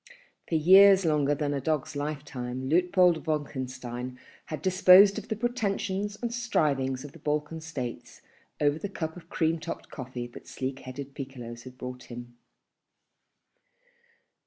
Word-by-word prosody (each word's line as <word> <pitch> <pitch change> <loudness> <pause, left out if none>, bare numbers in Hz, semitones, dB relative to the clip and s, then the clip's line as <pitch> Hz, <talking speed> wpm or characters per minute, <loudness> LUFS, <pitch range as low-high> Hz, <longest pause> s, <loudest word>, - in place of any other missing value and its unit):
For 165 - 0
years 190 +4 +7
longer 145 -2 +2
than 145 0 -1
a 140 - -2
dog's 150 0 -1
lifetime 135 -4 -4
Luitpold 180 +1 +3
Wolkenstein 130 -4 -4 0.3
had 155 -2 -6
disposed 185 +1 +7
of - - -12
the 220 - -2
pretensions 205 -3 -2
and 235 -1 -3
strivings 140 - 0
of 145 - -9
the 165 - -15
Balkan 150 +2 -2
States 140 -7 -6 0.4
over 145 +1 +2
the 205 - -4
cup 160 -4 -4
of 170 -1 -13
cream 160 0 +1
topped 165 +1 -7
coffee 125 -3 -6
that 120 - -12
sleek 130 +1 -4
headed 135 +2 -8
piccolos 125 -4 -8
had 130 0 -11
brought 125 0 -7
him. 120 0 -9
150 Hz, 140 wpm, -28 LUFS, 130-180 Hz, 0.4 s, years